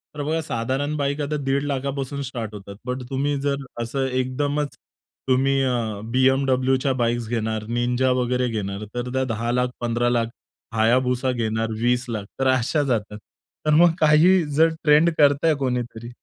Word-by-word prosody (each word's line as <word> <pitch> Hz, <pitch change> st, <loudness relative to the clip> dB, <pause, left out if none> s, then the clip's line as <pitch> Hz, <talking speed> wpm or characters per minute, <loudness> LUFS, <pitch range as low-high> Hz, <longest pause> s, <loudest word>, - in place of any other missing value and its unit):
तर 145 Hz, -, -4 dB
बघा 160 Hz, +2 st, -1 dB
साधारण 135 Hz, +3 st, -2 dB
बाईक 140 Hz, +1 st, -1 dB
आता 150 Hz, +1 st, -2 dB
दीड 135 Hz, +1 st, 0 dB
लाखापासून 140 Hz, 0 st, -3 dB
स्टार्ट 115 Hz, -5 st, -5 dB
होतात. 100 Hz, 0 st, -9 dB
पण 125 Hz, 0 st, -3 dB
तुम्ही 140 Hz, +2 st, 0 dB
जर 140 Hz, -1 st, -1 dB, 0.2 s
असं 135 Hz, +3 st, -2 dB
एकदमच, 140 Hz, +3 st, -1 dB, 0.5 s
तुम्ही 135 Hz, +1 st, +2 dB
अ, 115 Hz, -5 st, -1 dB
BMWच्या 130 Hz, 0 st, +2 dB
बाईक्स 120 Hz, -1 st, -1 dB
घेणार, 110 Hz, -2 st, -2 dB
Ninja 125 Hz, +2 st, +1 dB
वगैरे 125 Hz, +1 st, 0 dB
घेणार, 105 Hz, -2 st, -4 dB
तर 125 Hz, 0 st, -3 dB
त्या 130 Hz, 0 st, +1 dB
10 115 Hz, +2 st, -2 dB
लाख, 125 Hz, +1 st, +1 dB
15 120 Hz, 0 st, +1 dB
लाख 115 Hz, -1 st, +1 dB, 0.5 s
Hayabusa 125 Hz, +3 st, +2 dB
घेणार 110 Hz, -1 st, -1 dB
20 125 Hz, +1 st, +2 dB
लाख. 105 Hz, -3 st, -3 dB
तर 135 Hz, -, +2 dB
अशा 130 Hz, +5 st, +1 dB
जातात. 110 Hz, -6 st, -2 dB, 0.5 s
तर 150 Hz, -, +3 dB
मग 170 Hz, +2 st, +6 dB
काही 160 Hz, +4 st, +5 dB
जर 160 Hz, +1 st, +5 dB
ट्रेंड 150 Hz, +2 st, +5 dB
करतंय 145 Hz, +2 st, +4 dB
कोणीतरी 120 Hz, -3 st, -3 dB
130 Hz, 155 wpm, -23 LUFS, 120-140 Hz, 0.5 s, मग